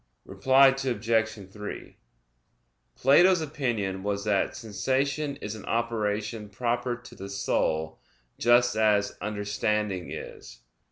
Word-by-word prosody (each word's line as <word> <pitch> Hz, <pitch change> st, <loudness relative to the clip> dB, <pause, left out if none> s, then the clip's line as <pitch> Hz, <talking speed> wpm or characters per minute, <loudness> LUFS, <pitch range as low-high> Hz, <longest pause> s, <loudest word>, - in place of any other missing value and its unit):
Reply 135 Hz, +1 st, +5 dB
Obj. 115 Hz, -4 st, 0 dB, 0.2 s
3: 105 Hz, 0 st, -8 dB, 1.0 s
Plato's 175 Hz, +7 st, +5 dB
opinion 120 Hz, -11 st, -2 dB
was 100 Hz, 0 st, -2 dB
that 100 Hz, -2 st, 0 dB
sensation 135 Hz, +6 st, -1 dB
is 105 Hz, -6 st, -6 dB
an 110 Hz, -3 st, -9 dB
operation 110 Hz, -2 st, -2 dB
proper 120 Hz, +3 st, -1 dB
to 120 Hz, 0 st, -14 dB
the 95 Hz, +1 st, -8 dB
soul, 80 Hz, -5 st, -1 dB, 0.4 s
just 120 Hz, 0 st, +4 dB
as 105 Hz, -2 st, +2 dB
understanding 105 Hz, -2 st, -2 dB
is. -, -, -9 dB
110 Hz, 105 wpm, -27 LUFS, 105-125 Hz, 1.0 s, Reply